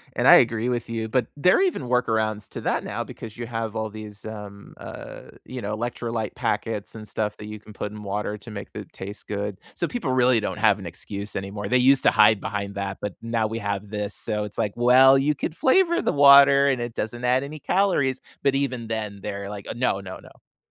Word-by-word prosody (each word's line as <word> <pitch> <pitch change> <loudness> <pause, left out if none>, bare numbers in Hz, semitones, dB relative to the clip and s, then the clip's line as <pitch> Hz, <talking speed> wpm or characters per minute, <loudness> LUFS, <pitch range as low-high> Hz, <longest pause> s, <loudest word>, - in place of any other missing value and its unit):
And - - +2
I - - +10
agree 115 +1 +3
with 120 -1 -2
you, 115 -1 -3
but 125 0 +1
there 180 +5 +4
are - - +2
even 370 - 0
workarounds 110 -4 0
to - - -7
that - - -1
now - - -3
because 110 -1 -10
you 120 - -4
have 115 -2 -4
all 110 0 -2
these, 105 -1 -9
um, 105 -2 -9
uh, - - -9 0.2
you 130 -1 -7
know, 105 0 -3
electrolyte 115 -1 -3
packets 115 -3 -2
and 110 -1 -8
stuff 105 0 -3
that 105 - -9
you 105 0 -7
can 105 +1 -14
put 105 +1 -5
in 105 0 -9
water 105 +1 -3
to 115 +3 -11
make 100 -2 -8
the - - -7
taste 100 +3 -8
good. 100 -1 -3 0.2
So, 170 - -1
people 235 - -3
really 125 -2 +4
don't 105 - -3
have 105 -1 +3
an 95 - -9
excuse 100 +4 -7
anymore, 100 +1 -4
they 125 - +4
used 135 +2 +4
to - - +5
hide 110 -2 +5
behind 100 -1 -4
that, 100 -1 -3
but 105 -2 -3
now 115 -1 0
we 110 +1 -4
have 100 -1 -3
this, 105 -1 -3
so, 105 0 -2
it's 105 0 -6
like, 105 -3 -1
"Well, 130 +3 +6
you 145 +2 +1
could 155 - -4
flavor 340 - +3
the - - 0
water 140 0 +7
and 130 -3 0
it 120 -1 -4
doesn't 120 +3 -4
add 125 +2 +2
any 150 +2 -7
calories." 145 -9 +1 0.2
But 140 -1 +3
even 130 -4 -2
then, 105 -3 -4
they're 100 -1 -5
like, 100 -1 -7
u - - -4
"No, 120 -5 0
no, 95 -1 -8
no." - - -20
110 Hz, 230 wpm, -24 LUFS, 105-125 Hz, 0.2 s, I